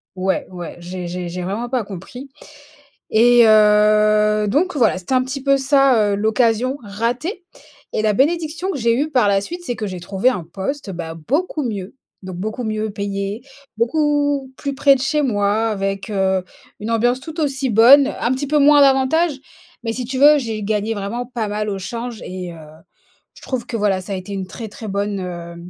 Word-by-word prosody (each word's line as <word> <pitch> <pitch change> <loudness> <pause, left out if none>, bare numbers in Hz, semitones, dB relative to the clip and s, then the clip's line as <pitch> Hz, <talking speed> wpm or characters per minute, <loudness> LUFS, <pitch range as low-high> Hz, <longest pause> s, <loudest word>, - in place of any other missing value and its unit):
ouais, 190 +1 -1
ouais, 175 -2 -7
j'ai 180 +1 -6
j'ai 180 0 -5
j'ai 180 +1 -5
vraiment 210 +7 -3
pas 255 -2 0
compris. 210 +8 -9 0.8
Et, 240 +2 +6
heu, 210 0 +4
donc 340 - +1
voilà, 230 -7 +3
c'était 185 +8 -6
un 255 - +3
petit 265 +1 -5
peu 275 0 +3
ça, 270 -6 +3
heu, - - +1
l'occasion 225 +5 +1
ratée. 240 - -3 0.5
Et - - -1
la 215 -1 +2
bénédiction 325 - 0
que 290 - -3
j'ai 230 0 +2
eue 300 +2 -1
par 250 -8 +3
la 195 -1 +3
suite, 345 - -6
c'est 245 -7 -3
que 215 - -4
j'ai 185 -2 -6
trouvé 195 +7 0
un 215 -9 -3
poste, 195 - -5
bah, 170 -2 -6
beaucoup 290 - -2
mieux. 205 -5 -5 0.3
Donc 185 -1 -7
beaucoup 215 +6 -4
mieux 215 0 -2
payé, 200 +2 -4 0.3
beaucoup 290 +2 0
plus 280 -1 -4
près 275 +1 +5
de 265 - -4
chez 300 +3 0
moi, 215 -3 +1
avec, 195 -1 -3
heu, 190 -2 +1 0.4
une 215 +2 -4
ambiance 245 +3 +1
tout 320 +3 -9
aussi 275 -2 -1
bonne, 255 +6 +7
un 235 - +1
petit 265 +2 -2
peu 300 +2 +2
moins 290 0 +6
d'avantages. 275 +3 +3 0.5
Mais 225 - -1
si 245 +1 -4
tu 260 +1 -4
veux, 295 +2 +7
j'ai 225 -5 -4
gagné 210 +2 -1
vraiment 220 +4 -4
pas 235 -3 -3
mal 210 +1 -3
au 200 -2 -2
change 230 +4 -6
et, 180 -1 -6
heu, 170 - -11 0.8
je - - -17
trouve 255 -3 -4
que 235 - -4
voilà, 200 -3 +1
ça 185 - -9
a - - -1
été 185 +2 -7
une 190 -1 -3
très 225 +4 -7
très 215 +1 -9
bonne, 200 0 -2
heu 170 -2 -7
225 Hz, 200 wpm, -19 LUFS, 200-270 Hz, 0.8 s, bonne